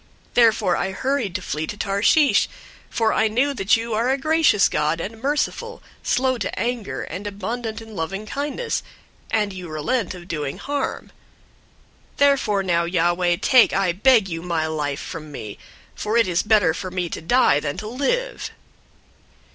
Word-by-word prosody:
Therefore 220 -6 +4
I 190 - -2
hurried 255 -5 -1
to 185 - -3
flee 155 -1 -3
to 210 - -6
Tarshish, 205 +10 +3 0.4
for 225 -1 +1
I 220 - +3
knew 255 +6 +1
that 225 -1 +3
you 230 0 -4
are 230 +4 +1
a 265 - +2
gracious 310 - +3
God, 150 +2 0
and 220 +6 -6
merciful, 300 - -2 0.2
slow 255 -1 +1
to 190 - -3
anger, 235 0 -2
and 200 +2 -6
abundant 220 +3 -4
in 220 -1 -12
loving 195 +5 -4
kindness, 290 - -3 0.5
and 210 -3 0
you 180 -2 -8
relent 175 +7 -1
of 175 -1 -11
doing 150 -5 -3
harm. 285 -1 -3 1.0
004:003 - - -32
Therefore 270 -8 +3
now, 170 -2 +1
Yahweh, 175 0 +1
take, 255 -3 +5
I 195 -2 +2
beg 215 +3 +4
you, 165 -2 -4
my 170 -2 -1
life 150 -3 -2
from 155 -3 -7
me; 105 -7 -8 0.3
for 215 +2 -1
it 230 -4 +4
is 175 -1 +1
better 210 -7 +3
for 185 +2 -5
me 180 -1 -2
to - - -6
die 235 - +4
than 145 -1 -4
to 210 - -5
live." - - -2
205 Hz, 170 wpm, -22 LUFS, 175-245 Hz, 1.0 s, take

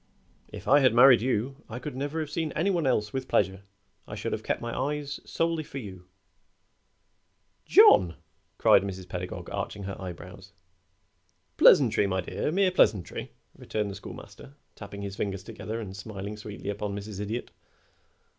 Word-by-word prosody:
If - - -10
I 145 +2 +6
had 130 -5 +4
married 125 -1 +8
you 130 +2 -1
I 115 - -6
could 130 +2 -6
never 145 +4 -3
have 150 -1 -5
seen 160 -3 -2
any 185 +6 +1
one 170 -6 0
else 105 -5 0
with 130 -1 -3
pleasure. 95 -1 +1 0.5
I - - -7
should - - -4
have - - -2
kept - - -2
my 120 0 -5
eyes 145 +1 -3
solely 165 -1 -1
for 140 - -9
you." 95 -7 -9 1.6
"John!" 85 -3 +7 0.4
cried - - +6
Mrs. 95 -2 -6
Pedagog, 90 +1 -6
arching 100 - -4
her 95 0 -6
eyebrows. 90 -3 -9 1.0
"Pleasantry, 100 - +6
my 95 -1 -1
dear 120 - -3
mere 190 +2 +3
pleasantry," 105 - +1 0.2
returned 105 -2 -3
the - - -7
Schoolmaster, 140 - -11 0.2
tapping 100 -1 -9
his 100 -1 -5
fingers 100 -2 -3
together 110 +3 -6
and 100 -4 -7
smiling 100 0 -6
sweetly 105 -1 -6
upon 105 0 -4
Mrs. 100 -1 -7
Idiot. 110 +4 -4
105 Hz, 160 wpm, -27 LUFS, 100-135 Hz, 1.6 s, married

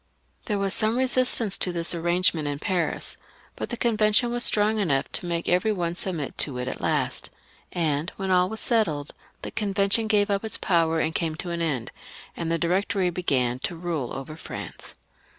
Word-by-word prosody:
There 210 -4 -1
was 195 0 0
some 220 +2 +3
resist 255 -1 +4
ance 205 -4 0
to 180 - +2
this 170 0 -1
arrangement 170 -2 +1
in 145 -1 -2
Paris, 175 +1 -2 0.4
but - - -5
the 240 - -4
Convention 220 +1 +3
were 240 - -1
strong 215 -2 +3
enough 140 -8 0
to 175 - -1
make 170 -1 -2
every 180 +5 +2
one 175 -4 -1
submit 175 -5 -3
to 140 - +3
them 125 0 -3
at - - -4
last, - - +1 0.4
and 155 -1 0
when 190 -1 -3
all 180 0 +4
was 220 +1 -4
settled, 160 - +1 0.3
they - - -5
gave 205 0 +2
up 200 0 +1
their 220 - -5
power, 165 -2 +2
the - - +2
Convention - - -15
came 160 -2 -1
to 175 +2 -5
an 170 0 -2
end, 140 -8 -2 0.4
and 165 -1 -3
the 165 - +2
Directory 185 +2 0
began 130 -8 0
to 170 - -3
rule 165 -7 -3
over 135 +3 -6
France. 160 - -8
180 Hz, 190 wpm, -25 LUFS, 160-205 Hz, 0.4 s, resist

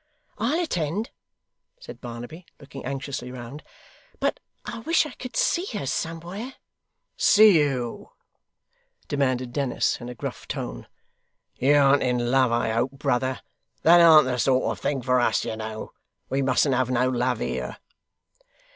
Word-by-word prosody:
'I'll 255 +10 +1
attend,' 190 - -2 0.7
said - - -11
Barnaby, 120 +8 -8
looking 140 -1 -10
anxiously 135 -1 -5
round; 125 +4 -8 0.6
'but - - 0 0.3
I 230 - -6
wish 325 +8 +2
I 300 - -7
could 250 -2 -9
see 350 +2 +1
her 140 - -4
somewhere.' 170 - -4 0.6
'See 205 -5 +6
who?' 130 -5 -2 1.0
demanded 130 -3 -1
Dennis 135 -3 0
in 120 - -7
a 125 - -7
gruff - - -7
tone. - - -5 0.7
'You 140 +3 +3
an't 140 0 +5
in 125 -1 0
love 130 -2 +3
I 115 -1 +1
hope, 120 +4 0
brother? 130 -2 -1 0.4
That 170 +2 +7
an't 160 -3 +8
the 125 -1 -2
sort 130 +1 +2
of - - -6
thing 135 -3 -2
for 125 0 +2
us, 120 - +1
you - - -3
know. 110 0 -6 0.4
We 135 +1 0
mustn't 135 +1 +2
have 130 0 +1
no 125 0 +2
love 125 -1 0
here. - - -4
135 Hz, 145 wpm, -25 LUFS, 125-160 Hz, 1.0 s, an't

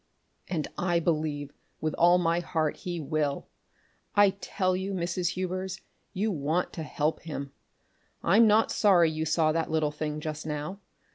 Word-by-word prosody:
and 160 -5 -2
I 175 -1 +2
believe 155 -3 -1 0.3
with 155 -1 -1
all 175 +1 +5
my 170 -1 +2
heart 160 -3 -1
he 175 -2 -4
will! 150 -1 -1 0.7
I 205 -1 +6
tell 185 -1 -1
you, 190 +1 -3
Mrs. 175 0 -1
Hubers, 185 +1 -3 0.3
you 210 +3 -1
want 160 +2 -1
to 165 - -5
help 155 0 -1
him! 140 -4 -6 0.7
I'm 220 +6 +6
not 220 +1 +4
sorry 175 -6 +4
you 160 0 -2
saw 155 0 +2
that 165 +1 -1
little 155 -2 +1
thing 150 0 -3
just 155 0 -5
now. 155 +5 -4
165 Hz, 155 wpm, -28 LUFS, 155-185 Hz, 0.7 s, I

